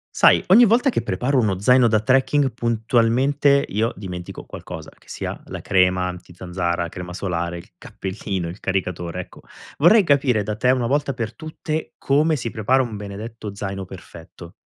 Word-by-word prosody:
Sai, - - +5
ogni 225 +7 +8
volta 235 +6 +3
che - - -1
preparo 125 +8 0
uno 105 -6 +1
zaino 125 +3 +5
da 110 -1 +3
trekking, 135 +4 +2
puntualmente 120 +5 +2
io 110 +4 -1
dimentico 90 -3 -7
qualcosa, 80 -1 -9
che - - -26
sia - - -5
la - - -7
crema 90 -1 +2
antizanzara, 90 -1 -4
crema 90 +1 -8
solare, 85 -2 -3
il 85 - -15
cappellino, 95 -2 -5
il 90 +4 -9
caricatore, 90 -2 -3
ecco. - - -14 0.4
Vorrei 195 +8 +6
capire 135 - +2
da 105 +1 -3
te 125 +4 +2
una 125 -2 +1
volta 140 +1 0
per 115 -3 -5
tutte 155 0 -5
come 150 +3 +2
si 120 -3 -4
prepara 120 +5 +1
un 115 -4 -4
benedetto 105 +1 -7
zaino 95 -1 -5
perfetto? 85 -2 -12
110 Hz, 165 wpm, -22 LUFS, 90-130 Hz, 0.4 s, ogni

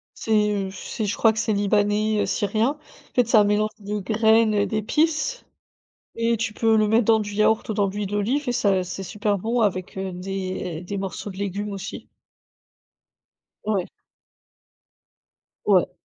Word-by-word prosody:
C'est, 210 -2 +1
heu, - - -7
c'est 200 +3 -5
je 200 - -2
crois 225 -1 +4
que 220 - -6
c'est 220 - +1
libanais 205 +1 +1
heu, - - 0
syrien 210 +5 +1
en 300 - -23
fait 245 -2 +3
c'est 240 - +4
un 210 - +7
mélange 210 +1 +1
de 210 +1 -4
graines 220 +2 +3
et 205 0 +2
d'épices. 310 - 0 0.7
Et 230 0 +1
tu 225 -1 -2
peux 225 0 +2
le 215 -1 +3
mettre 225 +1 +3
dans 225 0 +4
du 210 0 -5
yaourt 215 +1 +2
ou - - 0
dans 200 -1 +1
l'huile 205 +1 -3
d'olive 230 +8 -1
et - - +2
ça 200 -6 +2
c'est 190 +2 -6
super 205 +2 -1
bon 230 +5 -1
avec 190 -3 -1
heu, 190 0 -3
des 185 -2 -4
des 190 +2 -5
morceaux 195 +1 -5
de 190 - -9
légumes 200 +1 -3
aussi. 195 0 -7 1.6
Ouais. 200 -4 0 1.8
Ouais. 185 -3 +4
210 Hz, 170 wpm, -23 LUFS, 195-220 Hz, 1.8 s, un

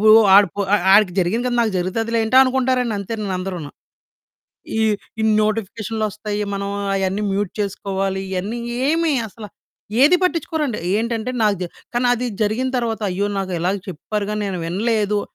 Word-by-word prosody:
వూ 215 - +4 0.3
ఆడి 200 -2 +7
పో - - -2 0.3
ఆడికి 205 -3 +5
జరిగింది 215 +8 0
కదా! 240 - -1
నాకు 225 -3 +1
జరుగుతదిలేంటి 225 +6 0
అనుకుంటారండి 255 -3 +1
అంతేను 205 -1 -4
అందరూను. 180 -6 -5 1.1
ఈ - - +2 0.4
ఇన్ని 220 -1 +3
నోటిఫికేషన్లు 220 +1 -2
ఒస్తాయి, 210 0 -4
మనం 200 0 -3 0.3
అయన్నీ 195 +1 -1
మ్యూట్ 200 -1 -1
చేసుకోవాలి. 195 -1 -2
ఇయన్నీ 200 +6 -3 0.3
ఏమి 325 0 +2 0.2
అసలు 210 0 -10 0.5
ఏది 310 +6 +7
పట్టించుకోరండి, 315 -7 0 0.2
ఏంటంటే 230 +1 -1
నాకు 210 -2 +3
దె - - -1 0.3
కానీ 245 +1 +2
అది 245 +1 -3 0.2
జరిగిన 225 +5 0
తరువాత 230 -2 -1
అయ్యో! 200 +3 -1
నాకు 190 -1 -3
ఇలాగ 185 +4 +1
చెప్పారు 200 +4 -3
గాని 210 0 -2
నేను 190 -2 -3
వినలేదు 210 +2 0
210 Hz, 150 wpm, -20 LUFS, 195-235 Hz, 1.1 s, ఆడి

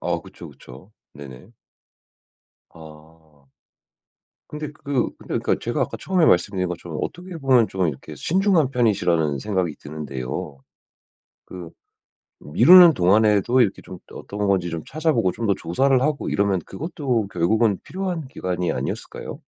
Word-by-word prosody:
아 - - -2
그쵸, - - -12
그쵸. 70 +12 -15 0.2
네네. 70 - -12 1.2
아. 80 -2 -17 1.0
근데 150 0 -6
그 140 -4 -2
근데 - - -4
그러니까 - - 0
제가 - - -3
아까 - - -4
처음에 185 -4 +1
말씀드린 90 +1 +2
것처럼 85 -2 -6
어떻게 180 0 -6
보면 130 -6 +3
좀 95 -2 -1
이렇게 70 -4 -6
신중한 185 -5 +1
편이시라는 90 - +1
생각이 95 -2 -2
드는데요. 70 -2 -6 0.9
그 90 -3 -10 0.7
미루는 170 - +7
동안에도 105 +5 +3
이렇게 105 -5 +1
좀 90 - -10
어떤 105 0 -5
건지 95 -3 +1
좀 85 -1 -5
찾아 155 +2 0
보고 110 -8 +1
좀 115 +3 -4
더 100 - +3
조사를 130 +11 +1
하고 150 -1 -1
이러면 100 -2 +1
그것도 140 - -3
결국은 100 +3 +1
필요한 180 -6 -5
기간이 90 -8 -3
아니었을까요? - - -6
100 Hz, 320 characters per minute, -22 LUFS, 85-135 Hz, 1.2 s, 미루는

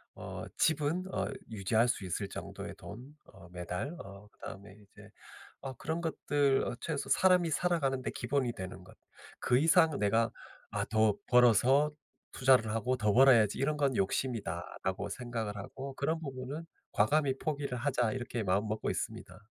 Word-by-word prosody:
어 - - -7
집은 160 +3 +1
어 - - 0 0.2
유지할 110 +3 +1
수 110 -5 -1
있을 95 +2 -3
정도의 - - -7
돈 125 +7 -10
어 95 -3 -15
매달 90 - -4
어 100 +1 -11
그다음에 100 +2 -10
인제 105 0 -17 0.7
그런 160 +3 -3
것들 145 -4 +1 0.2
'최소 150 -4 -3
사람이 180 -2 +4
살아가는 145 -6 +1
데 - - -3
기본이 125 0 -1
되는 95 -1 -7
것 - - -16 0.4
그 125 - +3
이상 160 0 +4
내가 115 +2 +2 0.4
아 - - -1
더 110 -1 +2
벌어서 125 +4 +5 0.4
투자를 125 -4 +4
하고 115 +3 0
더 105 -3 +2
벌어야지 120 -5 +6
이런 150 +3 +1
건 140 -2 +2
욕심이다.'라고 95 -2 -2
생각을 115 -5 -4
하고 135 +7 -7
'그런 160 +4 -1
부분은 135 +2 -6 0.3
과감히 135 +5 +2
포기를 140 -4 -3
하자.' 125 -3 0
이렇게 120 -2 -3
마음먹고 105 +3 0
있습니다. 90 - -4
125 Hz, 315 characters per minute, -32 LUFS, 105-140 Hz, 0.7 s, 벌어야지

